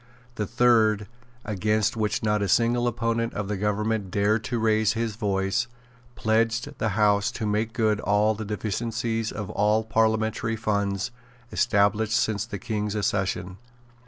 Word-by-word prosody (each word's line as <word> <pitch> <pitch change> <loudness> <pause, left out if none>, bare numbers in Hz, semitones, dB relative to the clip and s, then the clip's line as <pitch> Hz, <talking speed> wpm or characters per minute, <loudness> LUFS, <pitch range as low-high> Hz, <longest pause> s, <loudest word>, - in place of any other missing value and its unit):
The 105 -3 -3
third, 110 -4 +3 0.4
against 105 +3 0
which 110 -1 -1
not 105 -1 +1
a 100 - 0
single 120 +4 +2
opponent 115 0 -1
of 105 -1 -3
the 105 - -2
government 105 0 -1
dared 105 +4 +1
to 120 +3 -2
raise 110 -1 +2
his 115 -2 -2
voice, 95 -1 0 0.5
pledged 115 +1 0
the 110 - +1
House 105 -1 +3
to 110 - -3
make 105 +2 0
good 110 -3 +1
all 105 +1 +2
the 110 +1 -6
deficiencies 115 +2 -2
of 105 -3 -5
all 105 +2 +2
parliamentary 110 0 +1
fund's 100 0 -1 0.4
established 110 -1 +2
since 110 0 0
the 120 - -5
King's 105 -3 -3
accession. 95 -3 -1
110 Hz, 145 wpm, -25 LUFS, 105-115 Hz, 0.5 s, third